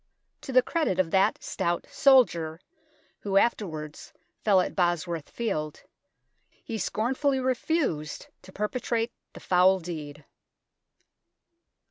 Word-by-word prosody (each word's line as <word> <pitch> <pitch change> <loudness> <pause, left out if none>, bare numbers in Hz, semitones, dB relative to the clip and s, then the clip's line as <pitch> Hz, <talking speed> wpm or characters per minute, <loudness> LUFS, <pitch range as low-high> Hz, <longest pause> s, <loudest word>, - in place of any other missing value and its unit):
To - - -7
the 255 -1 +5
credit 315 - 0
of 185 -3 +1
that 190 0 +2
stout 170 0 -2
soldier, 170 - +4 0.6
who 195 -1 0
afterwards 160 -9 -1 0.3
fell 200 -3 +5
at 180 - -1
Bosworth 175 -3 -1
Field, 155 -10 -3 0.7
he 225 -1 -7
scornfully 260 +8 0
refused 255 - -1 0.2
to 190 - -14
perpetrate 230 +3 -2 0.2
the - - -10
foul 185 +1 +4
deed. 150 -4 -7
190 Hz, 105 wpm, -27 LUFS, 165-240 Hz, 0.7 s, the